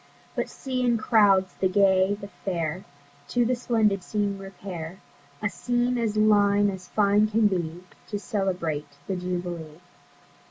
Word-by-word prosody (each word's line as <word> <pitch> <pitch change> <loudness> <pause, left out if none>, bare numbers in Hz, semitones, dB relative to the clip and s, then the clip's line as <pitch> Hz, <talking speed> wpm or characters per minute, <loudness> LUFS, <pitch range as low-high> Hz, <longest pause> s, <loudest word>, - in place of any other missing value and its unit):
But - - -2
see 260 -2 -3
in 240 -1 +3
crowds 200 -5 +4
the 190 - +3
Gay, 190 0 +4
the 200 - -7 0.2
Fair, 175 -2 -2 0.4
To 245 -1 +1
the 250 - +2
splendid 225 -5 +1
scene 200 0 -2
repair, 190 -2 -7 0.4
A - - +3
scene 245 0 0
as 220 -2 -1
line 205 -1 +4
as 185 -1 -9
fine 210 0 +3
can 220 +1 +2
be, 175 -3 -1 0.2
To 205 - -3
celebrate 180 -9 -2
the 195 - -2
Jubilee. 175 -3 -4
200 Hz, 145 wpm, -26 LUFS, 180-215 Hz, 0.4 s, crowds